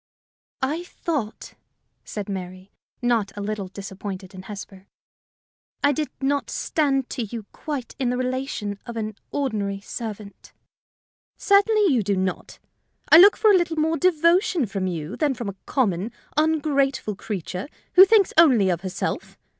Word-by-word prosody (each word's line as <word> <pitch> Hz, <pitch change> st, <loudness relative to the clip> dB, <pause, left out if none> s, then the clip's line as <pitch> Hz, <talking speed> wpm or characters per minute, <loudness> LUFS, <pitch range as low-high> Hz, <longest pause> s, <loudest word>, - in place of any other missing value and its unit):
"I 305 Hz, +6 st, -1 dB
thought," 290 Hz, -11 st, -4 dB, 0.5 s
said 205 Hz, -2 st, -6 dB
Mary, 185 Hz, 0 st, -7 dB, 0.3 s
not 235 Hz, -4 st, +1 dB
a -, -, -3 dB
little 205 Hz, -1 st, -3 dB
disappointed 195 Hz, 0 st, -7 dB
in 185 Hz, -, -8 dB
Hesper, 195 Hz, -1 st, -10 dB, 1.0 s
"I 285 Hz, -, +5 dB
did 300 Hz, +1 st, -2 dB
not 280 Hz, +1 st, 0 dB
stand 275 Hz, -4 st, 0 dB
to 255 Hz, -, -3 dB
you 225 Hz, -1 st, -5 dB
quite 285 Hz, -5 st, -6 dB
in 255 Hz, -3 st, +1 dB
the 250 Hz, -, -1 dB
relation 255 Hz, -5 st, -3 dB
of 235 Hz, -1 st, -6 dB
an 215 Hz, -1 st, -3 dB
ordinary 210 Hz, -8 st, -2 dB
servant." 210 Hz, -1 st, -8 dB, 0.8 s
"Certainly 405 Hz, -3 st, +4 dB
you 240 Hz, -, +3 dB
do 200 Hz, 0 st, 0 dB
not: 185 Hz, -1 st, -3 dB, 0.5 s
I 320 Hz, -, +11 dB
look 400 Hz, +3 st, +8 dB
for 435 Hz, -, +5 dB
a -, -, +6 dB
little 345 Hz, -3 st, +1 dB
more 320 Hz, +1 st, +2 dB
devotion 350 Hz, -, +3 dB
from 195 Hz, -2 st, -3 dB
you 165 Hz, +1 st, -4 dB
than 290 Hz, -4 st, 0 dB
from 230 Hz, -3 st, -4 dB
a 195 Hz, -, -7 dB
common, 210 Hz, -5 st, 0 dB, 0.2 s
ungrateful 285 Hz, -7 st, +1 dB
creature 185 Hz, -, -5 dB, 0.3 s
who 370 Hz, -, +10 dB
thinks 400 Hz, 0 st, +4 dB
only 240 Hz, -, +6 dB
of 170 Hz, -1 st, -2 dB
herself. 185 Hz, -1 st, -4 dB
235 Hz, 145 wpm, -24 LUFS, 200-305 Hz, 1.0 s, I